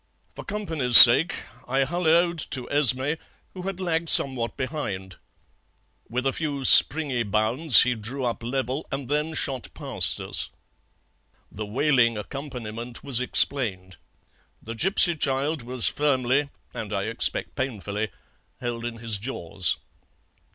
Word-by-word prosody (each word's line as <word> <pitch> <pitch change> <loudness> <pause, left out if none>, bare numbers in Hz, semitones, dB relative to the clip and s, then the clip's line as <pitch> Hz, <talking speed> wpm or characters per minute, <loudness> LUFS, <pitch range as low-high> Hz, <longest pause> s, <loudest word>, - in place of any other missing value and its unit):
For - - -11
company's 160 - +3
sake 150 +10 +9 0.3
I 135 +2 0
hulloed 170 +2 0
to 125 -3 -6
Esmé, 145 +2 +2 0.3
who 185 - -9
had 190 0 -7
lagged 165 -3 -2
somewhat 125 -4 +2
behind. 100 - -6 0.9
With 125 +3 -4
a 135 - -1
few 145 -4 -5
springy 140 -4 +5
bounds 115 +7 +3
he 125 - -1
drew 120 +4 -6
up 120 -1 -4
level, 130 +4 -5
and 135 -1 -6
then 150 +2 -3
shot 130 -4 -3
past - - 0
us. - - -3 1.0
"The 105 +1 -8
wailing 125 -1 0
accompaniment 120 -1 -8
was 130 -4 -1
explained. 100 -9 0 0.6
The 115 - -9
gipsy 175 - +3
child 140 +1 -2
was 125 0 +2
firmly, 140 -1 -1 0.2
and - - -8
I - - -3
expect - - -1
painfully, 105 -4 -5 0.5
held 120 -1 -6
in 120 -1 -7
his 115 -3 -4
jaws. 95 -6 -1
130 Hz, 130 wpm, -23 LUFS, 115-150 Hz, 1.0 s, sake